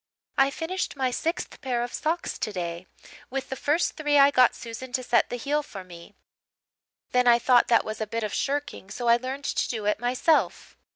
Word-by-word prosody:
"I 270 0 +4
finished 335 +5 -3
my 260 -2 0
sixth 330 +7 -3
pair 245 -2 -1
of 240 - -6
socks 325 +3 -2
today. 175 -3 -4 0.4
With 270 +1 -4
the 265 - -3
first 300 +6 0
three 295 -2 +2
I 280 0 +7
got 255 -2 +4
Susan 235 +2 -8
to 255 - -1
set 245 - +2
the - - -3
heel 290 +5 -1
for 200 -10 -9
me. 175 +2 -13 1.0
Then 250 0 +3
I 235 -1 +7
thought 245 0 +4
that 230 - +3
was 215 +1 -5
a 215 - -2
bit 230 +1 -3
of 210 - -3
shirking, 285 -8 -3
so 240 +4 -4
I 235 0 +6
learned 265 +3 -6
to - - -1
do 220 -3 -3
it 210 0 +1
myself. 255 +7 +1
250 Hz, 205 wpm, -26 LUFS, 225-280 Hz, 1.0 s, I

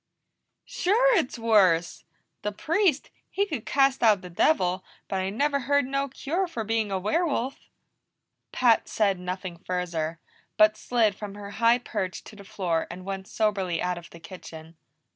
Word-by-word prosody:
"Sure 475 +6 +2
it's 310 - 0
worse! 195 -7 +3 0.4
The 210 - -2
Priest, 320 - 0 0.2
he 400 - 0
could 295 - -5
cast 275 -1 +3
out 215 -5 +5
the 180 - -9
devil, 185 - +2 0.2
but 195 - -2
I 190 0 -1
never 280 +7 0
heard 285 +2 +2
no 275 +1 -1
cure 320 +8 -2
for 295 -10 -4
being 220 -1 -1
a 190 - 0
werewolf." 270 - -1 0.8
Pat 235 -3 +3
said 200 -4 +1
nothing 180 -1 -5
further, 170 -3 -3 0.4
but 215 0 +6
slid 230 -4 +1
from 200 0 -8
her 205 -1 -8
high 230 +2 +4
perch 205 -7 -4
to 220 - -13
the 200 - -12
floor 180 -5 -2
and 185 +1 -9
went 195 0 -5
soberly 195 -6 0
out 180 -1 -1
of 170 - -14
the 170 - -13
kitchen. 165 -2 -11
210 Hz, 160 wpm, -26 LUFS, 185-270 Hz, 0.8 s, but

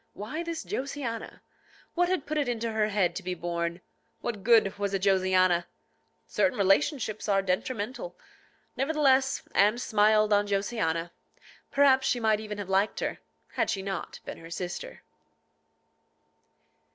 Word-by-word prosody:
Why 240 +11 -5
this 335 -1 -4
Josiana? 270 - -4 0.5
What 355 0 +2
had 365 -5 0
put 310 0 -1
it 280 -4 0
into 230 -1 -2
her 215 -1 +1
head 200 -4 +1
to - - -4
be 180 -1 -3
born? 170 0 -3 0.4
What 220 -4 -4
good 220 -4 +4
was 200 -1 -1
a - - 0
Josiana? 185 -2 +3 0.6
Certain 195 -3 +1
relationships 215 +2 +1
are 195 -1 +3
detrimental. 220 - -3 0.6
Nevertheless, 270 -1 +2
Anne 210 +3 +4
smiled 215 -2 +3
on 205 0 +3
Josiana. 195 -5 -1 0.6
Perhaps 275 -1 +4
she 245 - +1
might 220 -2 +2
even 210 -1 -6
have 205 -2 -5
liked 195 +2 +1
her, - - -3 0.3
had - - -1
she 195 -3 -2
not 195 -2 -5
been - - -7
her 165 - -11
sister. 175 +1 -6
210 Hz, 140 wpm, -28 LUFS, 195-260 Hz, 0.6 s, good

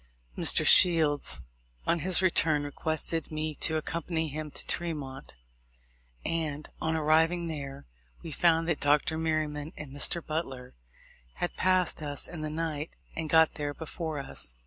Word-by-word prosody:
Mr. - - +3
Shields, 160 -5 +6 0.4
on 170 - +1
his 185 +3 +3
return, 160 -5 +4
requested 160 +2 -2
me 155 0 -3
to 160 +2 +1
accompany 160 0 -3
him 155 +1 -6
to - - -4
Tremont; 145 - -4 0.9
and, 155 -3 -2
on 160 0 -1
arriving 160 +2 +2
there, 140 - -7 0.4
we 165 - -7
found 165 +1 +2
that 165 -3 -1
Dr. 150 +3 +1
Merryman 155 -1 -2
and 150 -3 -9
Mr. 155 +4 -1
Butler 135 -6 -5 0.6
had 175 - -3
passed 185 -3 +1
us 145 -2 -1
in 165 -2 -8
the 155 - -3
night, 155 -1 -4 0.2
and 160 -1 -4
got 160 0 +4
there 145 -1 -5
before 160 -1 -6
us. 100 - -1
155 Hz, 145 wpm, -28 LUFS, 145-165 Hz, 0.9 s, Shields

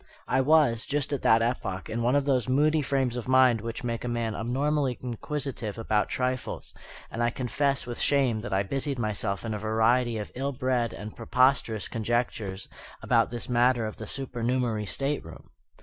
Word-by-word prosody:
I 130 - +2
was, 135 -5 +3
just 145 0 -1
at 140 - -1
that 115 0 +5
epoch, 115 -5 -2
in 115 +2 -3
one 120 +3 +2
of 145 -1 +2
those 130 -3 +1
moody 150 +4 +3
frames 135 -3 0
of 125 -1 -5
mind 130 -3 +5
which 115 +2 -5
make 115 -1 -3
a - - -3
man 120 -2 -1
abnormally 135 +3 0
inquisitive 125 -3 -4
about 110 -2 0
trifles: 130 0 -3 0.4
and 115 - -3
I 120 - +3
confess 135 +3 -1
with 120 -1 -6
shame 130 -6 +2
that 120 - -6
I 95 +1 +2
busied 135 +6 -2
myself 105 -2 -2
in 110 - -2
a 105 - -3
variety 115 +2 +2
of 105 - -5
ill 135 +2 -2
bred 125 -3 0
and 105 +1 -8
preposterous 125 -2 +2
conjectures 110 -4 -2 0.4
about - - +3
this 120 0 -5
matter 120 -1 +3
of 110 - -5
the 110 - -7
supernumerary 120 -4 -1
stateroom. 135 - -3
120 Hz, 180 wpm, -27 LUFS, 110-130 Hz, 0.4 s, that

